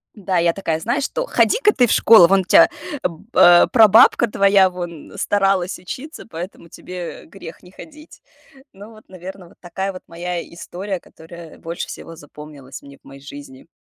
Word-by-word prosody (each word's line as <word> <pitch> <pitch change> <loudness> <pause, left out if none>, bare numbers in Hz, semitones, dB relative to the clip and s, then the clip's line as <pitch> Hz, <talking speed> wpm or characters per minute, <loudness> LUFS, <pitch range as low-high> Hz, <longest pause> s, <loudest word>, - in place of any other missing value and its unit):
Да, 190 -3 -3
я 170 0 +1
такая: 165 -5 -3
"Знаешь 245 - -2
что, - - -3
ходи-ка 455 -3 +2
ты 245 -2 +2
в - - -2
школу, 215 -7 +6
вон 195 +2 +2
у - - -7
тя - - +5 0.3
б 170 -1 -5
э, 175 0 +6
прабабка 225 +1 +5
твоя 195 -2 +3
вон 175 -3 -9
старалась 195 -2 0
учиться, 265 - -10
поэтому 170 -2 -9
тебе 180 0 -9
грех 165 - -13
не 180 - -17
ходить". 305 +7 -15 0.5
Ну 205 +3 -14
вот, 215 -1 -19
наверно, 185 0 -11
вот - - -24
такая 190 +2 -5
вот 185 - -12
моя 175 +1 -5
история, 190 +2 -7
которая 165 0 -14
больше 170 +1 -6
всего 165 - -10
запомнилась 145 -3 -13
мне 140 0 -15
в - - -44
моей 135 0 -14
жизни. 140 -1 -13
180 Hz, 175 wpm, -19 LUFS, 170-200 Hz, 0.5 s, школу